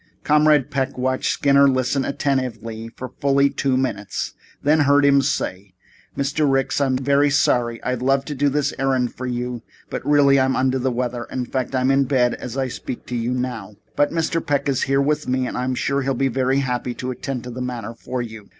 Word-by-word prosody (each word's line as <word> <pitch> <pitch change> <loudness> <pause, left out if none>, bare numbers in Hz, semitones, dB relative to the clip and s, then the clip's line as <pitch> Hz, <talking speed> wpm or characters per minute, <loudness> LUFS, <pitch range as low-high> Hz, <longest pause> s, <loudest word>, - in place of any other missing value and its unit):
Comrade 150 -2 +3
Peck 135 -2 -2
watched 130 +1 0
Skinner 140 0 +4
listen 130 +1 0
attentively 115 -5 -2
for 130 - -6
fully 140 0 +3
two 135 -1 0
minutes, 105 -7 -3 0.3
then 150 +2 +4
heard 145 0 +4
him 140 -1 +5
say: 100 -9 -3 0.4
"Mr. 140 +1 +1
Ricks, 135 +1 +1
I'm 130 -2 +2
terribly 140 +2 +3
sorry. 120 -4 +1
I'd 125 -1 -2
love 135 +1 +2
to 150 - -4
do 145 +1 +1
this 145 0 0
errand 130 -2 +1
for 130 - -6
you, 125 -1 -3 0.3
but - - -4
really 140 -2 +4
I'm 130 0 +2
under 130 0 +1
the 130 +1 0
weather. 120 -1 -2
In 125 -1 -4
fact, 130 +1 -3
I'm 130 +1 +2
in 135 0 +3
bed 125 -2 +2
as 125 +1 -6
I 135 -1 0
speak 120 - -7
to 125 - -3
you 115 0 -1
now. 120 -5 -4 0.2
But 145 - +3
Mr. 165 0 -1
Peck 140 -1 0
is 135 -3 +1
here 135 0 +1
with 150 +2 0
me 130 0 0
and - - -4
I'm 125 +1 -1
sure 140 +2 0
he'll 135 0 -1
be 135 +2 +1
very 130 +2 +1
happy 125 -2 -2
to 130 0 -4
attend 130 -1 -5
to 125 - -7
the 125 +2 -6
matter 125 -2 -4
for 125 +2 -4
you." 110 -3 -10
130 Hz, 210 wpm, -21 LUFS, 125-140 Hz, 0.4 s, him